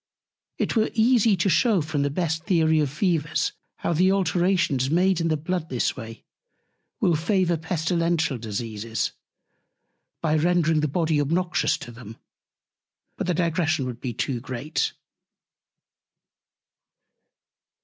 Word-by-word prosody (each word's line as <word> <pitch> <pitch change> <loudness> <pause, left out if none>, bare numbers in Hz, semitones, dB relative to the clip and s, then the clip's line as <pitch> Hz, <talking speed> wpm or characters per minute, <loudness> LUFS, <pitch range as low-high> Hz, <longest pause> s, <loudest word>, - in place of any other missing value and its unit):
It - - -1
were 220 -1 +2
easy 225 -3 +4
to 170 - +1
shew 200 - +3
from 150 -1 -2
the 145 - +1
best 160 +1 -1
Theory 160 -4 +3
of 150 -2 +1
Fevers, 155 0 0 0.3
how 170 - -1
the 185 +4 +3
Alterations 175 -7 +1
made 180 +2 +2
in 165 - +1
the 155 -1 +1
Blood 165 +1 -3
this 125 - 0
Way 115 -3 -9 0.8
will 175 - +3
favour 175 +2 +1
Pestilential 165 -3 0
Diseases, 110 0 -3 1.1
by 155 -1 +1
rendring 165 -2 +2
the 150 - +1
Body 155 0 +1
obnoxious 175 +5 +1
to 120 - -9
them: 115 -2 -11 1.0
But - - -4
the 180 - +1
Digression 165 -4 0
would 125 -2 -6
be 125 - -3
too 120 +2 -2
great. 130 +4 -3
160 Hz, 130 wpm, -24 LUFS, 140-180 Hz, 1.1 s, easy